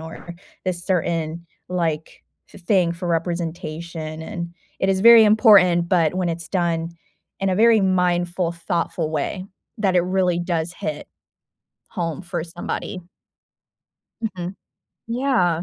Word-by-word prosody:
or 165 +2 -9 0.3
this 180 -2 -3
certain 170 -2 -1 0.2
like 165 -3 -3 0.2
th 185 - -15
thing 180 -3 +3
for 175 +1 -6
representation?" 165 -1 -3
and 170 -1 -6 0.3
it 190 - +1
is 190 -1 +2
very 230 +1 +9
important, 200 -6 +5
but 170 -3 +2
when 185 -1 0
it's 165 -1 -4
done 170 -2 -1 0.5
in 195 0 +1
a - - +1
very 225 0 +5
mindful, 180 -2 +1
thoughtful 170 -1 -2
way 160 +5 -2 0.3
that 195 -3 +1
it - - +6
really 180 -1 +1
does 175 -1 -2
hit 205 +3 -5 0.8
home 170 -3 -4
for 175 -2 -4
somebody. 175 +2 -5 1.2
Mhm, 185 -4 -4 0.5
yeah, 230 -9 +1
175 Hz, 125 wpm, -22 LUFS, 170-190 Hz, 1.2 s, very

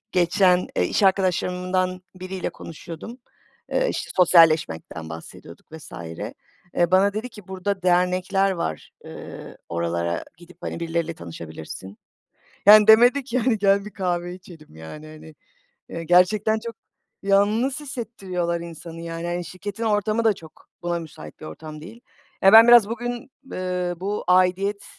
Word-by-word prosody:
Geçen, 180 0 +3
eee, 90 - +2
iş - - -1
arkadaşlarımdan 185 -1 +1
biriyle 185 0 -5
konuşuyordum, 170 +8 -10 0.5
eee, - - +1
işte - - -5
sosyalleşmekten 160 - +3
bahsediyorduk 80 - -11
vs. 160 -9 -11 0.8
Eee, 175 -1 +2
bana 195 +2 +4
dedi 220 +4 -4
ki 210 -5 -14
burada 190 +1 -3
dernekler 185 +2 +2
var, 80 - -4
ııı, - - -10
oralara 85 0 -2
gidip, 175 +1 -16
hani, - - -5
birileriyle 170 0 -2
tanışabilirsin. 85 +3 -9 0.7
Yani 210 +1 +9
demedi 245 +5 +6
ki, 255 0 -1
hani 240 -1 +1
gel 200 0 +2
bir 210 - -8
kahve 175 -2 -2
içelim, 175 - -14
yani, 80 - -10
hani, 155 0 -13 0.5
eee, 165 - -6
gerçekten 200 +6 +3
çok 230 -1 -6 0.5
yalnız 210 +7 +2
hissettiriyorlar 195 - -4
insanı, 165 0 -9
yani, 165 0 -5
hani, 175 0 -3
şirketin 200 +5 -6
ortamı 215 +1 +1
da 220 - +4
çok 160 -4 -16
buna 175 0 -2
müsait 140 - -11
bir - - -9
ortam 150 - -9
değil. 220 +9 -12 0.4
Ya, 195 - +7
ben 225 +1 +10
biraz 240 -3 +7
bugün, 240 +2 -5 0.2
eee, 180 -1 -2
bu 200 +3 -3
aidiyet, 185 +3 +2
185 Hz, 140 wpm, -23 LUFS, 165-205 Hz, 0.8 s, ben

